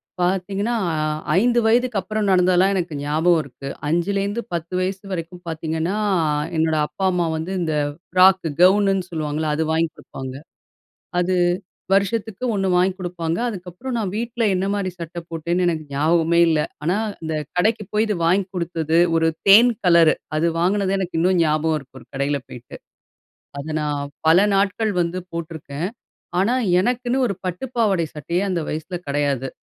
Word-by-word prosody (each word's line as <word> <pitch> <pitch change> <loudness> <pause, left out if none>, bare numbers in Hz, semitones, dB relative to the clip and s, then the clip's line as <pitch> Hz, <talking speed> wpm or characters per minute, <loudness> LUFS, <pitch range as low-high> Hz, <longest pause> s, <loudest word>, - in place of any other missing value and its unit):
இப் - - -20
பார்த்தீங்கன்னா, 195 +5 0 0.2
அ - - -2 0.4
5 240 +2 +3
வயதுக்கு 240 -1 +2
அப்புறம் 210 +2 -2
நடந்ததுலாம், 185 +1 +4
எனக்கு 175 -4 -2
ஞாபகம் 160 +3 +2
இருக்கு. 140 0 -9 0.2
5லேருந்து 200 +6 0
பத்து 170 +2 -5
வயசு 190 +1 -3
வரைக்கும் 175 +1 -6
பார்த்தீங்கன்னா, 160 +4 -2 0.6
என்னோட 160 0 +2
அப்பா, 190 - -4
அம்மா 175 -1 +1
வந்து 165 +4 -4
இந்த, 160 -2 -1 0.4
ஃப்ராக் 185 0 +5 0.2
கவுனுன்னு 195 -1 +4
சொல்லுவாங்கல்ல, 155 -1 -2
அது 160 +1 0
வாங்கி 165 0 +1
குடுப்பாங்க. 130 -1 -8 0.8
அது, 185 +1 +1 0.6
வருஷத்துக்கு 210 +3 0
1 195 -1 0
வாங்கி 185 +1 +3
குடுப்பாங்க, 170 -2 -3
அதுக்கப்புற 185 +2 -7
நான் 200 -5 -2
வீட்ல 235 +2 -2
என்னமாரி 195 +1 -1
சட்ட 170 +1 -7
போட்டேன்னு 170 +2 -1
எனக்கு 160 -2 -1
ஞாவகமே 165 +3 +2
இல்ல. 160 -1 +2 0.2
ஆனா 175 +5 +1 0.3
இந்த 160 0 -3 0.2
கடைக்கு 215 +4 +1
போய் 215 +1 +2
இது 210 -2 -1
வாங்கி 185 +3 +3
கொடுத்தது, 165 -2 -1 0.2
ஒரு 165 0 +3 0.2
தேன் 230 +5 +8
கலரு. 170 -3 +6 0.2
அது 165 +2 +2
வாங்கினதே 195 +2 +1
எனக்கு 180 -3 -3
இன்னும் 180 +1 +3
ஞாபகம் 155 +1 +1
இருக்கு, 135 -1 -16
ஒரு - - -18
கடையில 140 +1 -1
போயிட்டு. 120 -1 -10 0.8
அது 150 - -8
நான், 145 -1 -2 0.2
பல 165 +2 +7 0.2
நாட்கள் 205 +2 +1
வந்து 170 +2 -1
போட்ருக்கேன். 165 -1 -5 0.5
ஆனா! 225 +6 +2 0.3
எனக்குன்னு, 245 +4 0
ஒரு 200 - -2
பட்டு 180 +7 -3
பாவாட 205 -7 +2
சட்டைய 170 +6 -2
அந்த 175 - 0
வயசில 160 +4 -4
கிடையாது. 140 -2 0
180 Hz, 150 wpm, -21 LUFS, 160-195 Hz, 0.8 s, தேன்